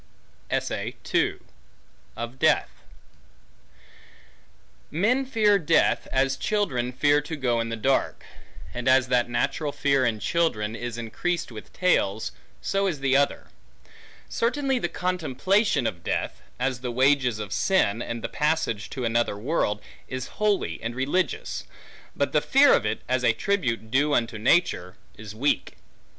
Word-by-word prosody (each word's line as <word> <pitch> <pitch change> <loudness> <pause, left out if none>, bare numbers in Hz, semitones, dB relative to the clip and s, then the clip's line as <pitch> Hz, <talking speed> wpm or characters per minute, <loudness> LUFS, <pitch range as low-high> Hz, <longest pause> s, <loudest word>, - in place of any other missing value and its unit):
Of 120 - -4
Death - - +3 2.2
MEN 230 - +1
fear 210 -5 +3
death, 165 -1 +2
as 135 0 +1
children 135 - -1
fear 145 +3 +3
to 150 +2 -5
go 125 -5 0
in 115 0 -2
the 115 - -2
dark; 130 +5 0 0.5
and 125 +1 -4
as 130 -1 +4
that 125 -1 +2
natural 130 +5 -1
fear 140 -2 +1
in 115 -3 0
children, 110 -6 0
is 120 0 -5
increased 125 +9 -3
with 110 -2 -10
tales, 110 - +1 0.3
so 195 0 +1
is 155 -7 -3
the 135 -1 +2
other. 140 +1 +1 0.8
Certainly, 265 +2 0
the 175 - -2
contemplation 180 - 0
of 90 -7 -3
death, - - -2 0.2
as 130 0 -1
the 125 - -3
wages 130 -2 +3
of 105 -2 -5
sin, 120 - +2
and 115 -1 -4
passage 150 -9 0
to 130 -3 -4
another 115 -2 +1
world, 105 -4 -1 0.2
is 130 -1 -5
holy 210 -2 +1
and 115 +1 -4
religious; 145 +5 -1 0.5
but - - 0
the - - +3
fear - - +5
of - - +2
it, - - -2
as 130 0 0
a 115 - +4
tribute 115 - -1
due 145 +3 +3
unto 115 -2 -1
nature, 110 - +2 0.2
is 105 0 -10
weak. 140 +6 0
130 Hz, 135 wpm, -25 LUFS, 115-165 Hz, 2.2 s, fear